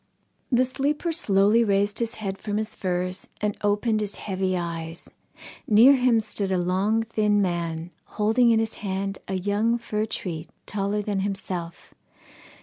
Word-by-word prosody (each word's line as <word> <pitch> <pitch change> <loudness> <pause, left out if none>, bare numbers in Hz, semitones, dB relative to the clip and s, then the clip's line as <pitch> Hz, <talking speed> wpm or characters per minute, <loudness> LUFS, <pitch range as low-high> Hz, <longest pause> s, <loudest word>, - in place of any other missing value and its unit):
The 250 +1 +4
sleeper 290 +6 -1
slowly 215 - +3
raised 205 0 +1
his 230 0 -1
head 195 -2 -4
from 205 0 -3
his 215 0 -3
furs, 185 0 -3
and 210 -1 -1
opened 210 +2 +1
his 205 -1 -3
heavy 190 -2 -2
eyes. 165 -1 -5 0.5
Near 235 +6 +7
him 250 -3 +3
stood 200 -2 -3
a 185 - +2
long 190 +5 +1
thin 210 -2 +1
man, 170 -3 -2 0.3
holding 225 +3 +4
in 230 - +5
his 225 0 0
hand 195 0 -2
a 190 - -2
young 205 +5 +1
fir 215 -2 -2
tree 165 -7 -4 0.2
taller 205 +1 -1
than 205 -1 -1
himself. 190 -3 -5
205 Hz, 150 wpm, -25 LUFS, 190-225 Hz, 0.5 s, Near